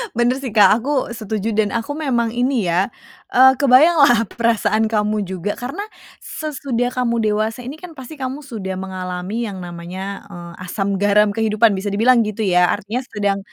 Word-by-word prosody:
Bener 240 +2 +2
sih 260 -5 -6
Kak, 210 0 +6
aku 270 +1 -1
setuju 220 -1 -3
dan 210 0 0
aku 230 +5 -3
memang 240 -7 0
ini 245 -3 0
ya, 180 +4 +2 0.5
eee, 265 +1 +6
kebayanglah 280 -3 +5
perasaan 225 -1 +1
kamu 210 -1 0
juga 190 +2 -4
karena 275 +12 -5 0.4
sesudah 265 -5 -3
kamu 240 -2 0
dewasa 215 +3 -1
ini 265 +4 -6
kan 360 -2 -9
pasti 265 +4 -9
kamu 265 0 -5
sudah 190 -7 -5
mengalami 185 +3 -4
yang 195 - -7
namanya, 180 +3 -7
eee, 175 -3 -10
asam 195 +2 -2
garam 205 0 +3
kehidupan, 220 -1 +3
bisa 195 +2 -3
dibilang 235 +4 +4
gitu 215 0 -3
ya. 180 -1 +3
Artinya 220 +6 -4
sedang 205 -5 -2
220 Hz, 165 wpm, -19 LUFS, 200-250 Hz, 0.5 s, Kak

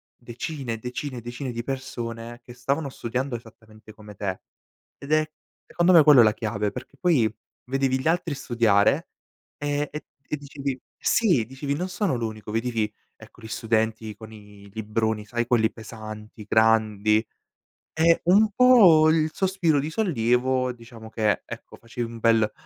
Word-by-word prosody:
decine, 120 0 -5
decine 125 +3 -5
e 120 - -6
decine 120 +3 -5
di 120 0 -5
persone 120 -3 -6
che 120 - -12
stavano 140 +4 -2
studiando 125 +1 -3
esattamente 110 -1 -13
come 105 -1 -13
te 95 -2 -4 0.6
ed 140 +1 -9
è, 155 0 +3 0.4
secondo 175 +1 +2
me, 160 -3 +8
quello 150 -3 +7
è - - +7
la 110 -1 +4
chiave 105 -2 -2
perché 125 - -10
poi 130 -12 +2 0.3
vedevi 130 0 0
gli 130 - -3
altri 165 -2 0
studiare, 115 -6 +2 0.5
ehm, 145 0 -1 0.4
e - - 0
dicevi: 140 -2 -5 0.2
"Sì", 175 - +2
dicevi: 135 +4 -4
"Non 180 +5 -3
sono 185 - -1
l'unico". 110 -2 -5
Vedevi, 115 -1 -1 0.2
ecco, 110 +1 -17
gli 110 - -9
studenti 110 -1 -1
con 110 +1 -12
i 105 -1 -14
libroni, 110 0 -2
sai, 120 +1 -2
quelli 115 -2 +2
pesanti, 110 -1 -10
grandi, 110 0 +3 0.7
ehm, 165 +1 +4
un 205 +5 +5
po' 200 -10 +6
il 155 -1 +2
sospiro 185 -6 +1
di 145 +3 -3
sollievo, 130 - +1
diciamo, 115 -2 -13
che, 110 -2 0
ecco, - - -10
facevi 115 0 -6
un 115 - -9
bel: 115 -2 +3
120 Hz, 155 wpm, -25 LUFS, 110-145 Hz, 0.7 s, me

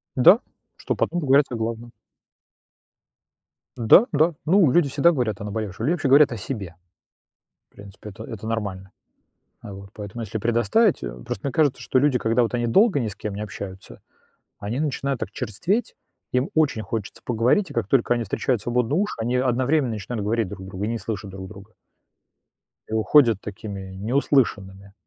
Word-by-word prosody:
Да, 160 - +7 0.4
чтоб - - -3
потом 175 - 0
поговорить 140 0 +4
о 120 - -4
главном. 115 +1 -4 1.9
Да, 120 - +6
да, 155 +2 +3
ну, 170 -5 +4
люди 170 -2 +3
всегда 150 +5 +4
говорят 115 - -2
о - - -4
наболевшем, 105 +1 -4
либо 170 - +3
вообще 145 - -2
говорят 140 +1 +6
о 115 - -4
себе. 95 -6 -6 1.0
В - - -37
принципе, 100 +1 -11
это 95 - -10
это 110 -4 -8
нормально. 100 -4 -4 0.7
А 100 - -9
вот. 100 0 -11
Поэтому 105 +3 -7
если 110 0 -4
предоставить, 120 - +2
э, - - -4
просто 100 - -5
мне 135 - -2
кажется, 145 -1 +2
что 130 - +1
люди, 135 -2 +3
когда 115 +2 +1
вот 115 - -1
они 120 -1 0
долго 195 - +4
ни 115 - -1
с 105 - -7
кем 105 -2 -5
не 105 - -6
общаются, 95 - -8 0.6
они 110 +7 -3
начинают 140 -3 -2
так - - -4
черстветь, 195 - -2 0.4
им 125 +6 +1
очень 145 -8 +1
хочется 105 0 -5
поговорить, 125 - +1
и - - -9
как 115 -5 -1
только 120 +1 +2
они 120 -1 -2
встречают 115 +3 -1
свободные 125 +4 0
уши, 205 +1 -1
они 120 +3 -1
одновременно 130 +2 +1
начинают 105 0 -4
говорить 110 -2 0
друг 95 +1 -9
другу 95 +1 -5
и - - -1
не 115 0 -2
слышат 105 -2 -5
друг 95 0 -8
друга. 100 +1 -13 1.2
И 110 - -5
уходят 115 -1 +4
такими 100 -2 -7
не 105 +6 -4
услышанными. 100 -9 0
115 Hz, 180 wpm, -23 LUFS, 100-135 Hz, 1.9 s, Да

